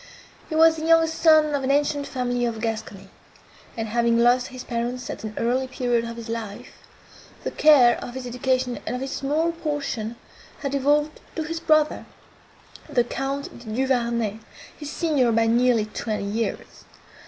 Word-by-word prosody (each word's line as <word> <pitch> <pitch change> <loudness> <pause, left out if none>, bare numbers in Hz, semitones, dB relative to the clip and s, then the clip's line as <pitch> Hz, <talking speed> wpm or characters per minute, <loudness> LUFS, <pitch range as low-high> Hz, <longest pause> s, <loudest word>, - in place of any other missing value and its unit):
He 315 - -3
was 325 0 +6
the 315 - -4
younger 330 0 +5
son 315 -2 +4
of 280 -1 -1
an 260 - -1
ancient 285 0 +1
family 245 -1 -2
of 230 -2 -3
Gascony; 220 -3 -5 0.7
and, 225 -1 -2
having 235 +1 +2
lost 245 +1 +3
his 255 -1 -9
parents 240 +1 -3
at - - -8
an 215 -1 -6
early 250 +3 0
period 245 -2 0
of 230 0 -7
his 230 0 -8
life, 225 -3 -6 0.6
the - - -3
care 270 -6 +5
of 245 - -8
his 260 -1 -5
education 250 0 -1
and - - -1
of 250 - -4
his 270 - -5
small 305 +5 0
portion 290 -9 -3 0.5
had 275 - -2
devolved 295 +2 +1 0.2
to 320 - -2
his 330 +1 -4
brother, 310 -2 +2 0.8
the 255 -5 +2
Count 270 +2 -4
de 240 - -14
Duvarney, 235 -2 0 0.4
his 295 -2 -8
senior 295 -7 +1
by 225 0 +3
nearly 235 -1 +3
twenty 215 -1 -4
years. 220 +3 -4
250 Hz, 165 wpm, -24 LUFS, 235-290 Hz, 0.8 s, was